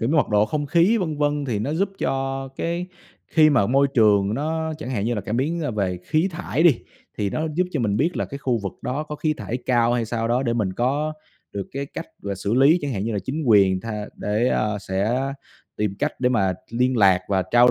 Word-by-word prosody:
kiểu 115 - 0
như 160 - +2
mật 150 - +3
độ 105 -1 +3
không 150 -2 -2
khí, 175 +9 +4
vân 160 -5 -2
vân. 145 0 0
Thì 120 -6 -1
nó 135 +8 -2
giúp 185 +5 +1
cho 135 0 -2
cái 170 +2 -2 0.4
khi 155 -2 +5
mà 125 -9 +3
môi 135 +4 +3
trường 105 -3 +4
nó 160 +3 -2
chẳng 130 -4 -6
hạn 105 -5 -1
như 120 +1 0
là 105 - -2
cảm 105 +4 -3
biến, 160 +6 0
ơ, 145 - -1
về 95 -4 -1
khí 160 +5 +1
thải 165 -1 -2
đi, 155 -9 +5 0.4
thì 100 -2 0
nó 155 +1 -1
giúp 180 +2 +2
cho 150 - -1
mình 105 -3 +1
biết 165 +8 0
là - - 0
cái 140 - -7
khu 125 -4 0
vực 100 -2 -4
đó 135 +4 -2
có 150 -1 -7
khí 155 0 0
thải 125 - -4
cao 120 -1 +3
hay 120 -2 +1
sao 115 0 -2
đó 125 +3 +2
để 120 -3 0
mình 105 -5 0
có 140 +8 0 0.4
được 100 -2 -4
cái 140 +1 -3
cách, 165 - -7 0.2
gọi 100 - -4
là, - - -1
xử 100 +4 -2
lý 140 +6 +5
chẳng 140 -2 -2
hạn, 100 -1 -2
như 115 - -2
là 100 - -1
chính 155 +4 -3
quyền 95 -4 +5
tha 105 -2 -5
để, 110 +4 0
à, 105 -1 0
sẽ 100 +6 -1 0.6
tìm 105 -2 -1
cách - - 0
để 125 - +3
mà 95 -7 +1 0.2
liên 125 +2 +1
lạc 95 -3 +5
và 95 -2 +2
trao 120 +1 +6
125 Hz, 255 wpm, -23 LUFS, 105-150 Hz, 0.6 s, trao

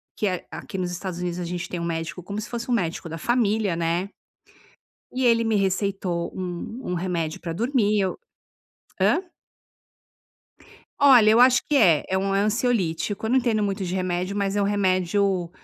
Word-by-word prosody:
que 210 - -1
é 180 -2 -3
aqui 195 - -7
nos 180 -1 -2
Estados 180 0 -5
Unidos 180 0 -3
a - - -3
gente 175 0 -4
tem 175 - -4
um - - -4
médico 165 +1 -4
como 200 +3 -5
se 215 - -6
fosse 235 0 -5
um 245 - +2
médico 170 -5 -2
da 165 - -5
família, 215 -3 +1
né? 170 +3 -1 1.0
E 255 0 -1
ele 230 -1 +4
me 225 -2 +1
receitou 190 -3 -1
um 185 +6 -5
um - - 0
remédio 170 -3 -2
para 165 -1 -4
dormir 220 +1 +1
e - - +3
eu 190 -1 -1 0.8
Hã? 350 - +3 1.8
Olha, 250 -6 +7
eu 225 - +5
acho 250 0 +6
que 295 - +2
é, 165 - +5
é 190 - +1
um, 195 0 0
eh, - - +3
ansiolítico. 210 -3 0
Eu 220 - -1
não 260 - +4
entendo 230 -4 +1
muito 195 -1 -2
de 180 +2 -3
remédio, 185 +1 -2
mas 200 0 -1
é - - +2
um 200 - +2
remédio, 190 -2 +1
195 Hz, 190 wpm, -24 LUFS, 175-220 Hz, 1.8 s, Olha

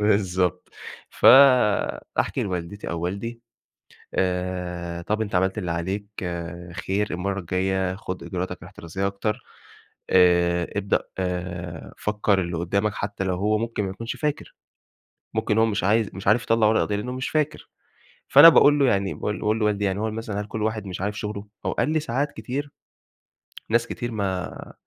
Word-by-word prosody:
بالضبط، 95 -4 +1 0.4
فأحكي 130 -6 +4
لوالدتي 90 +1 -4
أو 85 - -3
والدي، 100 +7 -4 0.7
آآ 90 -2 -2
طَب 105 +5 -1
أنت 100 -3 -5
عملت 95 +3 +1
اللي 90 -5 -3
عليك، 95 +5 -2 0.8
خير، 100 +2 +1
المرّة 100 +3 -2
الجاية 95 +1 -1
خُد 95 -2 -6
إجراءاتك 90 0 -4
الاحترازية 95 +4 -5
أكتر، 100 +2 -2 0.7
آآ 85 -1 +4
ابدأ 100 -1 +1 0.2
آآ 90 -2 -4
فكّر 105 -2 +1
اللي 85 -2 -3
قدّامك 100 +5 0
حتى 100 -1 -3
لو 95 -1 0
هو 105 +3 +1
ممكن 115 -2 -2
ما 95 - -3
يكونش 115 +5 -5
فاكر، 150 -2 -3 0.8
ممكن 110 -1 0
هو 110 - +5
مش 110 -2 -1
عايز 110 +2 +2
مش 95 - -7
عارف 110 +4 +4
يطلّع 115 -1 +3
ورق 110 - +3
قضية 105 - -1
لأنه 105 +5 -3
مش 130 0 -3
فاكر. 155 -1 -1 0.6
فأنا 145 +4 +10
باقول 145 -2 +6
له 140 - +5
يعني 100 -4 +1
باقول 105 - -3
باقول 110 +1 +1
لوالدي 105 -1 +1
يعني 95 0 -1
هو 110 +1 -1
مثلًا 110 -2 -4
هل 105 - -7
كل 110 0 -4
واحد 110 -1 -2
مش 90 -1 -6
عارف 105 +2 -2
شغله؟ 105 -1 -5 0.2
هو - - +1
قال - - 0
لي: 155 0 +2
"ساعات 140 0 -1
كتير 140 +3 -5 1.0
ناس 115 +1 +2
كتير 120 0 -4
ما 95 -4 -4
100 Hz, 160 wpm, -24 LUFS, 90-110 Hz, 1.0 s, فأنا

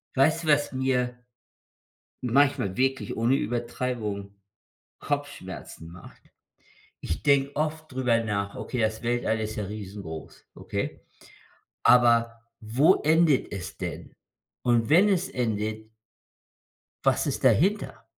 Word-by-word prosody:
Weißt 155 +5 +3
du, 160 - -6
was 145 -1 +3
mir 130 -2 0 1.1
manchmal 135 -5 +2
wirklich 135 +1 0
ohne 120 +4 +3
Übertreibung 115 -5 -3 0.7
Kopfschmerzen 145 - -5
macht? 85 +1 -14 0.8
Ich 80 - -4
denke 140 -1 +3
oft 155 +1 -2
drüber 125 -3 +1
nach: 100 -2 -2
„Okay, 125 -3 -3
das 110 +1 -1
Weltall 120 -2 0
ist 110 0 -4
ja 105 - -3
riesengroß, 100 -5 -8
okay? - - -4 0.8
Aber, 115 -1 +4 0.2
wo 125 - +4
endet 160 -2 +3
es 100 -3 -6
denn?“ - - -6 0.5
Und 120 -1 +2
wenn 185 +7 +6
es 190 0 +1
endet 110 - -2 1.2
„was - - +2
ist - - -3
dahinter?“. 205 +6 +2
120 Hz, 110 wpm, -26 LUFS, 110-145 Hz, 1.2 s, wenn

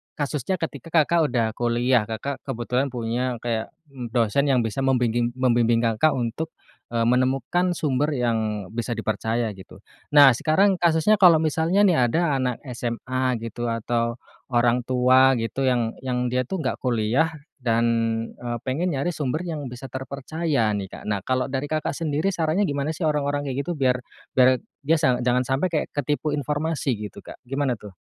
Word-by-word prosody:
kasusnya 145 +4 -2
ketika 165 0 -5
Kakak 170 +1 +2
udah 120 -2 +2
kuliah, 120 0 +2
Kakak 115 +5 -4
kebetulan 125 +1 -1
punya 120 +2 -2
kayak 115 -2 -2 0.4
dosen 120 +4 +2
yang 130 -3 +3
bisa 115 +4 -3
membingging 120 -2 +1
membimbing 120 -2 +2
Kakak 115 +7 +2
untuk, 130 +7 -3 0.4
eee, 115 -1 +1
menemukan 130 +8 +1
sumber 150 -1 0
yang 110 -5 -1
bisa 120 +1 -2
dipercaya, 110 0 -1
gitu. 95 0 -13 0.4
Nah, 140 -2 +9
sekarang 190 - +3
kasusnya 170 +5 +4
kalau 180 -4 +8
misalnya 160 +5 +1
nih 175 - +3
ada 165 -3 +1
anak 125 -2 -1 0.2
SMA 125 +2 -1
gitu, 120 +1 -4
atau 115 +1 -1 0.4
orang 120 0 +2
tua 130 +1 +5
gitu, 125 +4 -2
yang 120 -3 +1
yang 125 -1 0
dia 125 0 +1
tuh 190 +3 -3
nggak 130 - -2
kuliah 120 +4 +2 0.3
dan, 115 -2 +1 0.5
eee, 120 -1 -4
pengen 165 +8 0
nyari 140 +6 -1
sumber 150 +2 -2
yang 155 -4 -4
bisa 125 +2 -8
terpercaya 140 0 -2
nih, 95 -1 -4
Kak. - - -9
Nah, 105 - 0
kalau 130 0 0
dari 135 +2 -2
Kakak 155 -2 -1
sendiri 155 +3 0
sarannya 175 +2 0
gimana 145 +1 -1
sih - - -12
orang-orang 145 -1 -1
kayak 130 - -4
gitu 175 - -2
biar 130 -3 +2 0.4
biar 130 -1 +5 0.3
dia 165 +3 +4
sang 130 -5 +2
jangan 125 0 +3
sampai 135 +7 +1
kayak 155 - 0
ketipu 145 +2 -1
informasi 150 +1 -1 0.2
gitu, - - -19
Kak, - - -11
gimana 135 0 0
tuh? 100 -3 -12
130 Hz, 165 wpm, -24 LUFS, 120-150 Hz, 0.5 s, Nah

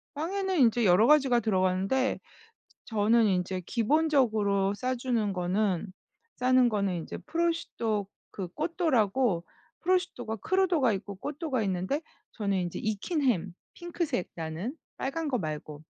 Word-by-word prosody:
빵에는 375 +3 -1
인제 235 -2 +4
여러 185 +5 +5
가지가 270 -5 +5
들어가는데 195 +5 +1 0.7
저는 225 +1 +3
인제 185 -1 0
기본적으로 225 - +2
싸주는 240 -2 -1
거는 185 +1 0 0.5
싸는 255 0 +4
거는 195 -6 -1
이제 - - -7
prosciutto 320 - -1 0.2
그 190 -3 -5
cotto라고 260 - +1 0.4
prosciutto가 340 -11 0
crudo가 360 - +3
있고 200 0 -6
cotto가 290 -4 -2
있는데 190 - -1 0.3
저는 200 -3 -1
인제 175 -1 -3
익힌 220 - -2
햄 195 -8 +1 0.2
핑크색 340 - -3
나는 165 - -4 0.2
빨간 315 +4 -2
거 265 -3 0
말고 155 -2 -5
225 Hz, 370 characters per minute, -29 LUFS, 195-285 Hz, 0.7 s, 여러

